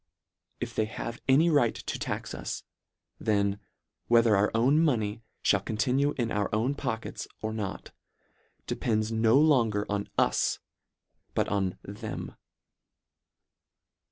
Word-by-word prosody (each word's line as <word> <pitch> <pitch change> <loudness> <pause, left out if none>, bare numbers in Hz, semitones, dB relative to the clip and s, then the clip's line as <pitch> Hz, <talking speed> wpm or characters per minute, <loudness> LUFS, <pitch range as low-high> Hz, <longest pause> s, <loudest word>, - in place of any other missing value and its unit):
If - - -4
they 110 - +1
have 115 +2 -6
any 155 +6 +5
right 140 -7 +3
to - - -5
tax - - -4
us, - - -5 0.6
then, 100 -2 +1 0.5
whether 115 -2 +5
our 100 +1 +3
own 130 +7 +4
money 115 -8 +1 0.2
(hall - - +4
continue 130 +6 0
in 120 -3 -1
our 105 -1 0
own 115 +6 +1
pockets, 120 -5 -4
or 110 0 -3
not, 105 -3 -5 0.7
depends 110 -2 -1
no 115 +2 +4
long 130 -9 +4
er 105 - -1
on 100 0 -1
us, - - +2 0.8
but - - +1
on 95 -3 0
them. 105 +2 -6
110 Hz, 130 wpm, -28 LUFS, 105-125 Hz, 0.8 s, any